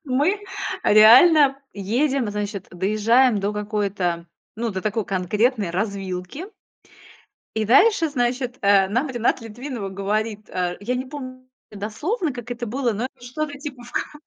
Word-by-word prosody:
мы 295 +9 +1 0.5
реально 270 +7 +7 0.2
едем, 240 +4 0
значит, 205 -2 -4
доезжаем 215 +5 +2
до 200 +1 -1
какой-то, 200 -5 -2 0.3
ну, 230 0 -2
до 190 -2 -4
такой 215 +1 -1
конкретной 205 +3 0
развилки 195 - -4 1.1
и 220 - 0
дальше, 330 - +4
значит, 250 -2 -2
э, 200 -1 +5
нам 245 +8 0
Рената 240 -1 0
Литвинова 230 -2 -6
говорит, 210 +2 -3
а, 180 -1 -2
я 235 +5 -2
не 255 +1 -2
помню 255 -2 -9 0.2
дословно, 290 - -3
как 245 -1 -9
это 240 0 -4
было, 240 +1 -1
но 215 +4 -3
это 245 - -16
что-то 285 +3 -4
типа, 275 -3 -8
в 240 - -13
конце. - - -3
230 Hz, 145 wpm, -22 LUFS, 205-260 Hz, 1.1 s, реально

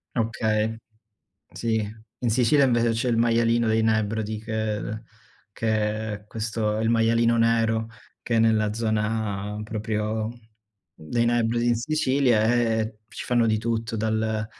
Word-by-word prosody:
Okay, 110 -1 0 0.8
sì, 115 -1 -1 0.4
in 120 - -1
Sicilia 130 +4 +4
invece 120 -2 +2
c'è 115 +2 -1
il 115 - +1
maialino 115 0 +2
dei 110 0 +2
Nebrodi, 110 0 0
che 110 0 -3 0.5
che 110 -1 -1
è 105 +1 -10
questo 110 0 -2
il 115 +1 +1
maialino 115 0 +3
nero, 115 -1 +2 0.3
che 115 - -1
è - - +4
nella 110 -2 +2
zona 110 -2 -2
proprio 110 0 -2 0.6
dei 115 +10 -2
Nebrodi 120 0 +1
in 120 - +3
Sicilia, 130 -4 +2
e 110 -2 +1
ci - - -8
fanno 120 -2 +2
di 110 0 +2
tutto, 115 0 -2
dal 110 0 -1
110 Hz, 130 wpm, -25 LUFS, 110-115 Hz, 0.8 s, Sicilia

